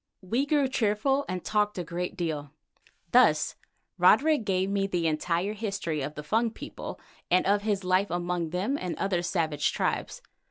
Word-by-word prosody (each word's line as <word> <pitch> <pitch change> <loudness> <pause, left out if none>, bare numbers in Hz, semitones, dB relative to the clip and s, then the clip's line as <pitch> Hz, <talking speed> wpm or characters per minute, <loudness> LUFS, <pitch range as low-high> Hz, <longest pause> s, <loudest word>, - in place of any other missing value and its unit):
We 235 +9 0
grew 285 -2 +3
cheerful 260 +3 +1
and 185 -1 -4
talked 210 -1 +1
a 180 - -2
great 175 +3 -4
deal. 155 -5 -3 0.6
Thus - - +4 0.5
Roderick 300 -6 +5
gave 190 -1 +1
me 195 0 0
the 175 -3 -1
entire 170 +5 0
history 195 -8 -3
of 150 +3 -4
the 150 - -6
Fung 225 +9 +1
people 225 - -8 0.3
and 180 +1 +3
of 200 +1 +3
his 205 -2 -1
life 185 +2 +2
among 175 -1 -2
them 195 - -1
and 180 -2 -4
other 190 -3 0
savage 160 -4 0
tribes. - - -2
190 Hz, 165 wpm, -28 LUFS, 175-210 Hz, 0.6 s, Roderick